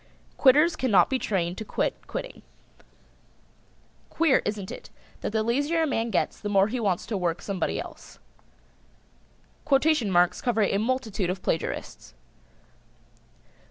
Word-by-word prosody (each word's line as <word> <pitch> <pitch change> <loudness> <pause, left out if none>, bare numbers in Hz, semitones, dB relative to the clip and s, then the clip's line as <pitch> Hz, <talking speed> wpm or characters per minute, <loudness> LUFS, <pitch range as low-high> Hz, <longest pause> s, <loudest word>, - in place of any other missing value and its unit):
"] - - -33
Quitters 300 +5 +5
cannot 215 - +3
be 260 - +1
trained 180 -5 -2
to - - -4
quit - - -3
quitting. - - -6 1.7
Queer, 325 -5 +3
isn't 205 -2 -3
it, - - -9 0.3
that - - -4
the 220 0 0
lazier 285 +8 +1
a - - +2
man 235 -5 -1
gets 195 - -1
the 205 - -4
more 200 0 +3
he 250 +3 -2
wants 195 -6 0
to 215 - -4
work 175 -2 -1
somebody 195 -4 -2
else. - - -10 1.5
Quotation 280 -4 +2
marks 175 0 +2
cover 225 -3 +1
a 200 0 +1
multitude 220 -5 -1
of 185 0 -4
plagiarists. 65 - -4
220 Hz, 140 wpm, -26 LUFS, 190-265 Hz, 1.7 s, Quitters